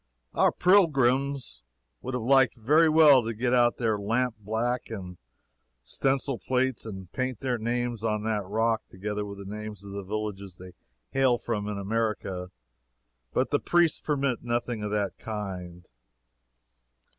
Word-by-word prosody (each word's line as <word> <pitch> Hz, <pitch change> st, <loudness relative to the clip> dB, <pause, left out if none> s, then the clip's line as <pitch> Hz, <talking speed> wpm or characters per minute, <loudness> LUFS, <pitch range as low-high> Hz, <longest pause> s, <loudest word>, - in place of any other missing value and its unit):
Our -, -, +4 dB
pilgrims 140 Hz, -7 st, +2 dB, 0.4 s
would 130 Hz, 0 st, -4 dB
have 125 Hz, -, -2 dB
liked 135 Hz, 0 st, +4 dB
very 150 Hz, +8 st, +4 dB
well 150 Hz, -5 st, +7 dB
to 115 Hz, 0 st, -3 dB
get 120 Hz, +3 st, 0 dB
out 120 Hz, -1 st, +4 dB
their 110 Hz, -3 st, 0 dB
lampblack 115 Hz, +2 st, -1 dB
and 90 Hz, -5 st, -7 dB, 0.6 s
stencil 135 Hz, -2 st, 0 dB
plates 130 Hz, +2 st, -1 dB
and 95 Hz, -4 st, -8 dB
paint 130 Hz, -3 st, -3 dB
their 125 Hz, -3 st, -1 dB
names 120 Hz, 0 st, -2 dB
on 105 Hz, -2 st, 0 dB
that 110 Hz, -2 st, -1 dB
rock, 110 Hz, +2 st, +1 dB
together 105 Hz, +2 st, -4 dB
with 100 Hz, 0 st, -8 dB
the 100 Hz, +1 st, -7 dB
names 105 Hz, -2 st, -7 dB
of 100 Hz, -, -9 dB
the 100 Hz, 0 st, -5 dB
villages 100 Hz, -2 st, -5 dB
they 90 Hz, 0 st, -11 dB, 0.4 s
hail 130 Hz, -2 st, +3 dB
from 110 Hz, -3 st, -3 dB
in 105 Hz, -1 st, -3 dB
America, 100 Hz, -3 st, -2 dB, 0.8 s
but -, -, 0 dB
the -, -, +3 dB
priests 175 Hz, -2 st, +2 dB
permit 140 Hz, -4 st, -1 dB
nothing 120 Hz, -1 st, -2 dB
of 105 Hz, -, -3 dB
that 100 Hz, -2 st, -2 dB
kind. 90 Hz, -5 st, -6 dB
115 Hz, 145 wpm, -27 LUFS, 105-130 Hz, 0.8 s, well